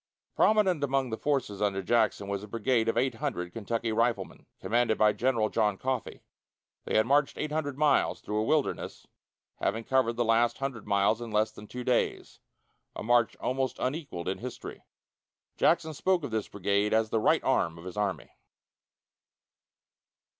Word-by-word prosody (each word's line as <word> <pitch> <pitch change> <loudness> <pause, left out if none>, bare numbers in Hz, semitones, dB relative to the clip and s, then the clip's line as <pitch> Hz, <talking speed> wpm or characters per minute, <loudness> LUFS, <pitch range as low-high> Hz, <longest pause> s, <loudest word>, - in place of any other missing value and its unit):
Prominent 190 -8 +3
among 135 -2 0
the - - -1
forces 130 -9 -1
under 100 -2 0
Jackson 110 -1 +1
was 100 -1 -3
a 105 - -9
brigade 115 +1 +1
of 115 - -1
eight 130 +2 +2
hundred 90 -12 -4
Kentucky 115 +1 -2
riflemen, 115 +2 -1
commanded 120 -1 +1
by 105 -1 +4
General 115 -1 +1
John 105 -3 +1
Coffee. 130 0 -3 0.6
They - - +1
had 110 - +4
marched 140 +3 +2
eight 150 - -3
hundred 145 -3 -2
miles 150 -2 +2
through 105 +1 -3
a - - +1
wilderness, 150 +5 -1 0.5
having 115 +3 -1
covered 130 -2 +2
the 120 +1 0
last 115 +1 +2
hundred 135 -6 -5
miles 100 +3 +2
in 120 - -5
less 110 0 +1
than 105 - -12
two 125 +2 -6
days 125 -1 -1 0.6
a - - -5
march 120 0 +3
almost 130 0 -2
unequalled 130 - -4
in 95 - -2
history. 125 0 -8 0.7
Jackson 160 -1 +2
spoke 180 +3 +1
of 140 - -4
this 110 -2 -2
brigade 100 +2 0
as 110 -1 +1
the 110 - +2
right - - +3
arm 85 0 +1
of 85 - -11
his 90 - -7
army. 100 -7 -2
115 Hz, 170 wpm, -29 LUFS, 105-135 Hz, 0.7 s, by